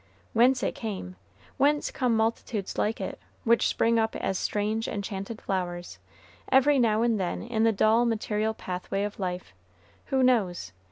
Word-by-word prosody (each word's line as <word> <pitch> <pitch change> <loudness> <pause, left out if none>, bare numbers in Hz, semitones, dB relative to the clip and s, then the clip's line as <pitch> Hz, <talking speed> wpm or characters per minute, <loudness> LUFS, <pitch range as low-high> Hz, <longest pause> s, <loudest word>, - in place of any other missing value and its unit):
Whence 250 +3 +4
it - - 0
came, 190 - -5 0.4
whence 290 +1 +2
come 250 -3 +1
multitudes 220 -2 -1
like 215 +2 0
it, - - -5 0.2
which 235 -1 +3
spring 230 0 +2
up 220 0 0
as 190 - -2
strange, 215 +2 -1
enchanted 200 +2 -5
flowers, 175 -2 -4 0.5
every 270 +1 +5
now 225 -2 +3
and 230 -3 +2
then 180 -2 -2
in 225 -1 0
the 225 - +5
dull, 220 +3 +3
material 220 -1 -1
pathway 185 +2 -3
of 205 0 -5
life, 180 - -4 0.5
who 265 -2 +2
knows? 190 - +1
220 Hz, 155 wpm, -27 LUFS, 195-235 Hz, 0.5 s, every